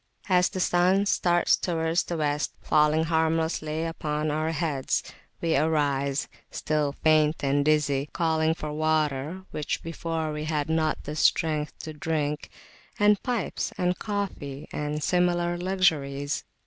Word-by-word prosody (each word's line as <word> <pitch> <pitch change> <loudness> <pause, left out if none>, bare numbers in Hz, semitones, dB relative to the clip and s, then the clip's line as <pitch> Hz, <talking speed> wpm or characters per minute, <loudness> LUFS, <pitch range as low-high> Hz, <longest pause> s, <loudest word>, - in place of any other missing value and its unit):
As 180 -1 +4
the 185 - -5
sun 185 +3 +3
starts 175 -3 +3
towards 165 -1 0
the 170 - -4
West, 150 -1 -1
falling 155 +1 +3
harmlessly 160 -1 0
upon 155 -2 -2
our 155 +1 0
heads, 150 -4 -1 0.4
we 165 -1 +1
arise, 140 -2 +1 0.2
still 150 -2 -1
faint 155 -1 +3
and 140 +1 +2
dizzy, 145 -2 +1
calling 160 -1 +1
for 150 -2 -5
water 155 +2 0
which 150 - -3
before 165 -1 -3
we 150 0 -4
had 155 -1 -1
not 160 -1 0
the 150 - -5
strength 155 -2 +1
[p.211] - - -11
to 155 - -6
drink 150 -2 -2 0.5
and 205 -1 +4
pipes, 240 -6 -2
and 180 0 0
coffee, 185 -9 -4
and 150 0 -3
similar 175 0 +2
luxuries. 155 -7 0
155 Hz, 135 wpm, -26 LUFS, 150-170 Hz, 0.5 s, As